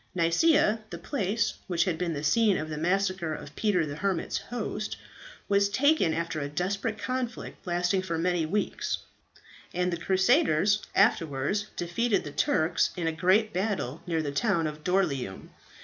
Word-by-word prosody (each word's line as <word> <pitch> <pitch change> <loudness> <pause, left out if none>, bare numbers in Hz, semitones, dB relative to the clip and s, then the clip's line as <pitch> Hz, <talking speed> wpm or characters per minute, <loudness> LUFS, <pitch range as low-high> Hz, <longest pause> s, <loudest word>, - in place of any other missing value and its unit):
"Nicaea, 210 - +3
the - - -6
place 225 -4 -1
which 175 -2 +2
had 170 -4 -2
been 175 -2 -1
the 145 -1 -4
scene 205 +6 +3
of 155 - -4
the 155 - -4
massacre 185 -1 0
of 145 - -10
Peter 200 -7 +1
the 145 0 -6
Hermit's 190 -1 -1
hosts, 215 -3 -4 0.5
was 200 0 +3
taken 285 - +3
after 165 0 -2
a 140 -1 -3
desperate 195 +8 -2
conflict, 255 -6 -4
lasting 180 +2 +1
for 170 -3 -3
many 175 0 +1
weeks, 200 +7 -1 0.8
and 180 0 0
the - - -1
crusaders 200 - +3
afterwards 190 - +2
defeated 195 +5 0
the 145 - -7
Turks 155 +3 +2
in 170 - -2
a 165 - +1
great 190 +7 +2
battle 185 - -2
near 165 -2 0
the 145 - -2
town 170 +1 +1
of 150 0 -5
Doryleum. 150 - -1
180 Hz, 160 wpm, -28 LUFS, 160-205 Hz, 0.8 s, Nicaea